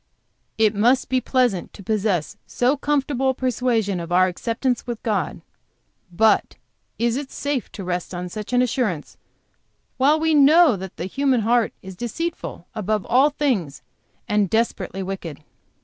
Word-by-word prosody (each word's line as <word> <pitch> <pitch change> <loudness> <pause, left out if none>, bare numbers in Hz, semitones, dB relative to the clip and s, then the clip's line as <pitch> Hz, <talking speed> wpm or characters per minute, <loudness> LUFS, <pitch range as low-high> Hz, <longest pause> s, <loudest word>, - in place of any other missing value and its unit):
It 220 -1 +3
must 240 +5 +2
be 255 -1 +1
pleasant 245 -7 0
to 200 - -12
possess 200 -5 -1
so 250 +4 +1
comfortable 280 -2 0
a - - +2
persuasion 235 -6 0
of 170 0 -7
our 185 +1 +5
acceptance 230 +7 -2
with 235 -2 -5
God; 215 -4 -1 0.7
but 215 +5 +2 0.4
is 235 +1 +1
it 280 -1 -5
safe 285 -3 -3
to 200 - -7
rest 180 -1 -3
on 180 0 -4
such 210 +5 -7
an 250 0 +3
assurance 215 - -2 0.8
while 290 +4 +4
we 320 0 +2
know 300 -1 +6
that 190 -1 -8
the 175 - -4
human 265 +3 +1
heart 230 +1 +2
is 190 -1 -9
deceitful 240 - -5
above 215 -2 -1
all 260 +5 +4
things 215 - -1 0.4
and 210 -2 +1
desperately 195 -4 -1
wicked?" 175 -6 -6
225 Hz, 150 wpm, -22 LUFS, 190-260 Hz, 0.8 s, know